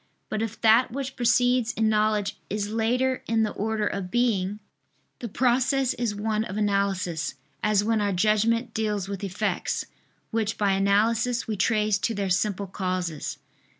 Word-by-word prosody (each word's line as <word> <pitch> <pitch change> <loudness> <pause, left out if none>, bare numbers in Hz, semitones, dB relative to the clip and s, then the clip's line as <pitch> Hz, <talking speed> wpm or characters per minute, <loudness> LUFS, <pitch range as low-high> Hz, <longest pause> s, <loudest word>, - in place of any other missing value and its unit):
But 215 - -2
if 225 0 -4
that 230 +3 +5
which 270 +1 -4
precedes 245 -1 +2
in 220 0 +1
knowledge 215 -1 +1
is 205 0 -2
later 250 +4 +1
in 225 0 +2
the 215 - 0
order 215 0 -1
of 195 -2 -3
being, 210 -3 0 0.6
the 235 - -5
process 255 +3 +2
is 235 -4 -2
one 215 +1 -1
of 195 -2 -6
analysis, 195 -6 0 0.3
as 210 -1 +2
when 220 0 +1
our 205 -1 +1
judgment 215 +5 +1
deals 210 -3 -1
with 200 0 -5
effects, 200 0 -2 0.5
which 220 -1 -1
by 205 -2 +2
analysis 220 +5 +2
we 220 - -1
trace 210 +1 +2
to 225 +2 -1
their 200 -2 -2
simple 200 +1 0
causes. 185 -5 -3
215 Hz, 155 wpm, -26 LUFS, 200-230 Hz, 0.6 s, that